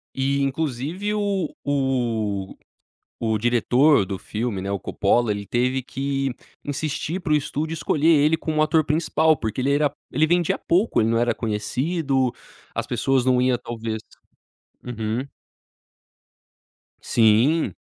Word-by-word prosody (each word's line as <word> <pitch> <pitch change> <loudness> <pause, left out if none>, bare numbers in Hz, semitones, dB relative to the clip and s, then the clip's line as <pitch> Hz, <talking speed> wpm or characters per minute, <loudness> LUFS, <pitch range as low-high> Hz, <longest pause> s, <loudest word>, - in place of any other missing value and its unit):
e 135 +1 0
inclusive 155 - -2
o 200 -3 -1
o 120 -8 -1 0.6
o 110 -2 0
diretor 120 +2 +3
do 95 0 -4
filme, 110 -2 -3
né, 100 - -4
o 100 - -1
Coppola, 120 -3 +1
ele 100 0 -4
teve 125 +3 0
que 135 +1 -2 0.3
insistir 155 +4 -3
para 155 - -3
o - - +5
estúdio 150 +2 -2
escolher 155 -1 0
ele 155 0 +5
como 155 -1 -3
o - - +4
ator 155 0 +3
principal, 155 0 +2
porque 110 +3 -3
ele 140 +2 +1
era 145 -1 +2 0.2
ele 155 +4 +3
vendia 175 0 +1
pouco, 190 +7 +1
ele 110 0 +2
não 115 - +2
era 120 0 +2
conhecido, 130 +4 -1 0.4
as - - -3
pessoas 135 -2 +1
não 130 -1 +3
iam 125 -1 +2
talvez 110 -2 -4 0.8
uhum. 115 +1 -3 1.8
Sim. 115 - +3
135 Hz, 135 wpm, -23 LUFS, 115-155 Hz, 1.8 s, o